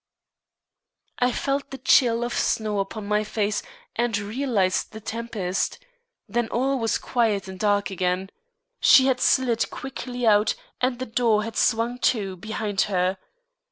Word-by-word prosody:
I 250 0 +3
felt 275 +2 -2
the 270 - -7
chill 240 -3 +4
of 240 - -3
snow 215 -2 0
upon 200 +2 -4
my 210 +1 +1
face, 210 -1 -1 0.3
and 235 -3 +1
realised 205 -3 -1
the 220 - -7
tempest. 220 -4 -3 0.5
Then 240 -1 -1
all 265 +4 0
was 225 -1 +1
quiet 215 -5 0
and 190 -1 -8
dark 205 -1 +1
again. 185 +1 -1 0.5
She 260 - +7
had 255 -1 +1
slid 240 -3 +2
quickly 250 -2 -5
out 210 -1 +4 0.3
and 250 -1 +1
the 255 - -4
door 225 -3 +2
had 225 +1 -6
swung 235 +2 +1
to 200 -7 0
behind 210 +1 -2
her. 185 0 0
225 Hz, 145 wpm, -24 LUFS, 205-245 Hz, 0.5 s, She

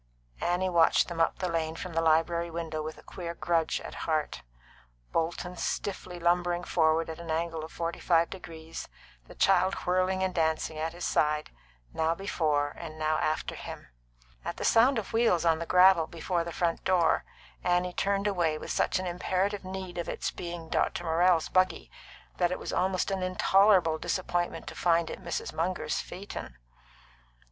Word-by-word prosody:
Annie 180 +2 +1
watched 170 -1 +4
them 170 -1 -2
up 165 - +2
the 185 - -2
lane 165 -2 -1
from 175 +1 -6
the 165 - +1
library 165 +1 +2
window 165 -2 -4
with 155 0 -6
a - - -15
queer 170 -2 -6
grudge 165 -2 0
at - - -8 0.2
heart; 155 -1 -1 0.7
Bolton 170 +2 -2
stiffly 185 0 -3
lumbering 175 0 +1
forward 160 -1 +2
at 160 0 -7
an 170 -1 -8
angle 165 0 -1
of 160 - -8
forty 170 0 -3
five 170 -1 +3
degrees, 165 -3 -8 0.4
the - - -13
child 190 +1 +3
whirling 185 +1 +1
and 190 -1 0
dancing 160 -1 0
at 160 +1 -2
his 175 0 -5
side, 150 0 +1 0.4
and - - -27
now 160 +1 +2
before 155 -7 0
and 155 -2 -7
now 155 0 +1
after 155 - -1
him. - - -8 0.5
At 170 - -4
the - - -3
sound 245 +3 +5
of 220 -1 -4
wheels 225 -7 +3
on 165 -1 +3
the 170 - -4
gravel 180 -3 +6
before 170 +1 -2
the 170 - -6
front 170 0 -1
door, 180 -3 +3 0.4
Annie 180 0 +1
turned 200 +1 0
away 175 -6 +1
with - - -6
such - - +1
an 185 - -3
imperative 185 +3 -1
need 185 -1 -6
of 170 - -3
its - - -2
being 170 -2 -6
Dr. - - 0
Morrell's 170 0 +3
buggy 185 0 +1 0.5
that 175 -1 +2
it 180 - -1
was - - -5
almost 185 +1 +1
an 190 -1 -1
intolerable 185 -2 +4
disappointment 175 -1 -2
to - - -7
find 170 -1 +2
it - - -8
Mrs. 170 - -3
Munger's 180 +3 -1
phaeton. 180 - -7
170 Hz, 175 wpm, -29 LUFS, 165-185 Hz, 0.7 s, gravel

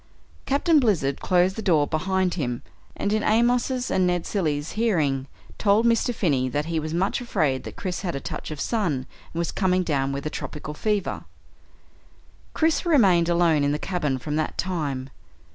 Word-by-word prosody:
Captain 300 +3 +3
Blizzard 175 - +1
closed 180 +1 +2
the 220 - -4
door 165 -8 +3
behind 185 +4 0
him, 125 -8 -3 0.3
and 205 - -1
in 215 - +1
Amos's 245 +3 +1
and 185 -1 +2
Ned 175 -1 0
Cilley's 155 -6 -1
hearing, 155 - 0 0.3
told 210 +2 +3
Mr. 235 +1 +3
Finney 140 - 0
that 145 +3 -1
he 165 -1 -1
was 155 0 -4
much 185 +9 0
afraid 155 - 0
that - - -7
Chris 185 -2 -4
had 180 -6 -3
a - - -2
touch - - -6
of 155 - -5
the - - -2
sun 210 -9 0 0.4
and - - -8
was 170 - -1
coming 185 -1 +1
down 140 -5 0
with 140 +1 -4
a 155 - -2
tropical 150 0 -6
fever. 205 +4 -2 1.3
Chris 320 0 +2
remained 195 - +4
alone 170 -4 +3
in 145 0 +2
the - - 0
cabin 150 -7 -1
from 150 +4 -3
that 155 - -2
time. 140 -8 -2
175 Hz, 180 wpm, -24 LUFS, 150-210 Hz, 1.3 s, remained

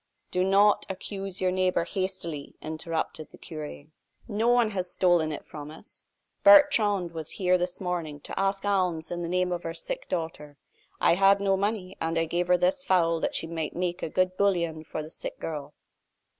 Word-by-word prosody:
"Do 180 - +1
not 200 +2 +4
accuse 195 0 -5
your 185 -1 +2
neighbor 185 -2 +1
hastily," 180 -6 -4
interrupted 160 0 -4
the - - -15
cure; 155 -3 -8 0.4
"no 220 +1 0
one 240 -2 +4
has 185 -3 -2
stolen 175 -4 +3
it 150 - -6
from 150 -1 -8
us. 160 +7 -13 0.4
Bertrande 230 - +6
was 160 -2 -4
here 185 -1 +2
this 180 0 -2
morning 170 -5 -3
to - - -6
ask 195 +1 0
alms 180 -5 0
in 175 0 -3
the 170 - -3
name 180 0 +1
of 175 -1 -2
her 165 -1 -5
sick - - -3
daughter. 160 -4 -4 0.4
I - - +4
had 195 +2 +5
no 195 -1 +2
money, 195 -1 -2
and 165 +1 -1
I 165 - +2
gave 175 +2 -1
her 180 0 +5
this 275 +6 +1
fowl 170 -6 +2
that - - -2
she - - +1
might 160 -2 -4
make 175 0 -2
a - - -3
good 185 +2 +1
bouillon 170 -5 +1
for 155 - -5
the 155 - -10
sick - - -6
girl." 150 -2 -6
180 Hz, 190 wpm, -27 LUFS, 165-195 Hz, 0.4 s, Bertrande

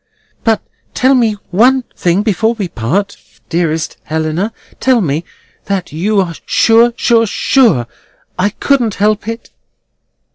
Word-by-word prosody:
"But 225 -2 +1 0.3
tell 260 +2 +3
me 235 -4 +3 0.2
one 250 +7 +4
thing 180 +3 +1
before 220 +2 +1
we 205 -5 -3
part, 180 - -2 0.3
dearest 165 -2 -1
Helena. 160 +6 -2 0.3
Tell 260 -2 +3
me—that 175 +3 -4
you 200 +6 +1
are 180 -3 -1
sure, 230 +1 +4
sure, 230 -2 +2
sure, 205 - +2 0.5
I 185 +3 +1
couldn't 235 -1 0
help 210 +1 0
it." 230 +1 -6
205 Hz, 120 wpm, -14 LUFS, 175-230 Hz, 0.5 s, one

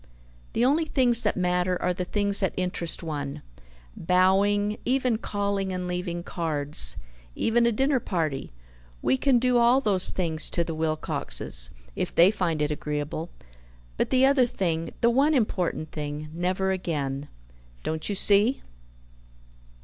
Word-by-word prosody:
The 235 - +1
only 305 +5 +2
things 250 -6 +3
that - - -1
matter 180 0 0
are 180 - 0
the 180 0 -4
things 200 +1 +2
that 190 - +1
interest 180 -3 -1
one. 145 -4 -5 0.5
Bowing, 200 +4 +1
even 250 -3 0
calling 200 -3 -2
and 180 -1 -4
leaving 180 -1 -4
cards, 155 -5 0 0.4
even 235 +1 +1
a - - +2
dinner 270 +4 +1
party 160 - -3 0.5
we 130 - +2
can 260 - +2
do 245 0 +2
all 240 +3 +4
those 200 -7 +3
things 160 -4 0
to 170 - 0
the 165 - -5
Wilcoxes, 155 - +1 0.3
if - - -4
they 175 +4 +6
find 165 -7 -1
it 150 - -1
agreeable; 150 +2 -4 0.7
but - - -1
the 260 0 +3
other 270 -2 +3
thing, 165 -7 -2
the 235 - +4
one 285 +5 +2
important 180 - -1
thing 150 0 -6
never 185 +3 -1
again. 145 -6 -3 0.6
Don't 160 +3 -2
you 205 - -1
see?" 205 +6 +5
185 Hz, 145 wpm, -25 LUFS, 160-225 Hz, 0.7 s, they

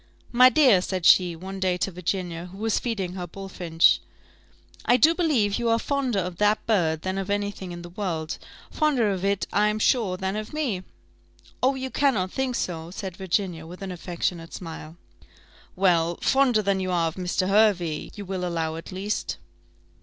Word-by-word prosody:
"My 250 +1 +7
dear," 255 -10 +5
said 185 -2 -3
she, 180 -2 +6
one 190 +3 -7
day 185 -1 +1
to 195 - -1
Virginia, 180 -1 -3
who 185 +2 -12
was 220 +1 0
feeding 195 -7 -3
her 180 -1 -5
bullfinch, 175 -3 +2 0.8
"I 245 - +4
do 315 +7 +5
believe 260 - +1
you 235 -1 0
are 230 - +4
fonder 265 -3 -1
of 180 -2 -2
that 210 +2 +2
bird 160 -8 +1
than 190 +1 -2
of 195 0 -4
any 205 0 0
thing 190 -3 -8
in 175 0 -7
the 175 - -9
world 170 -5 -3 0.3
fonder 265 -9 +2
of 190 -1 -3
it, 200 0 +1
I 210 +1 +3
am 210 0 0
sure, 215 -4 +2
than 190 +1 -2
of 215 +4 -5
me." 265 -12 -1 0.8
"Oh! 265 +2 +3
you 260 0 -4
cannot 215 -10 +1
think 265 -2 -1
so," 165 -6 -3
said 190 0 -6
Virginia, 180 -4 -2
with 180 +4 -9
an 190 - -5
affectionate 170 -1 -4
smile. 160 -2 -8 0.8
"Well! 175 -3 +2
fonder 260 -5 +3
than 195 -1 +1
you 185 0 -2
are 170 -2 +1
of - - -10
Mr. 185 +1 -1
Hervey, 195 -6 +2
you 205 - -7
will 185 -1 -4
allow, 165 -2 -2
at 165 - -9
least?" 195 +3 -3
190 Hz, 185 wpm, -25 LUFS, 175-215 Hz, 0.8 s, My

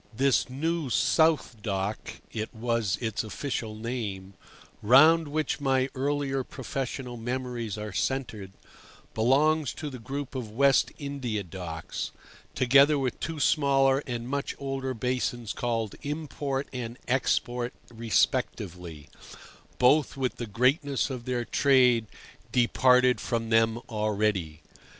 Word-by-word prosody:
This 130 +4 +2
New 160 +2 -2
South 145 0 +2
Dock 100 0 -3 0.2
(it 110 0 -4
was 115 -3 0
its 110 -2 -2
official 110 -1 -4
name), 110 -4 -5 0.5
round 155 +8 +6
which 155 +1 -1
my 135 -1 +1
earlier 135 0 -1
professional 130 -3 -5
memories 120 -2 -4
are 105 -1 -6
centred, 110 -5 -2 0.6
belongs 145 +6 +2
to 150 -2 -5
the 130 - -8
group 135 +4 -5
of 125 -5 -4
West 135 +4 +3
India 135 -8 -3
Docks, 85 -2 -6 0.5
together 140 +4 +5
with 130 -3 -2
two 165 -2 -4
smaller 135 -2 +3
and 120 -1 -4
much 140 +1 -3
older 135 -1 -3
basins 120 -2 -2
called 115 -3 -2
Import 145 -2 -3
and 120 -1 -5
Export 125 -1 0 0.2
respectively, 90 -7 -1 0.7
both 140 +3 +3
with 130 -2 -2
the 120 - -5
greatness 135 - +1
of 125 -2 -6
their 125 -2 -1
trade 125 -5 +4 0.4
departed 125 +1 +4
from 115 -2 -2
them 115 0 +3
already. 105 -8 -1
125 Hz, 120 wpm, -27 LUFS, 110-135 Hz, 0.7 s, round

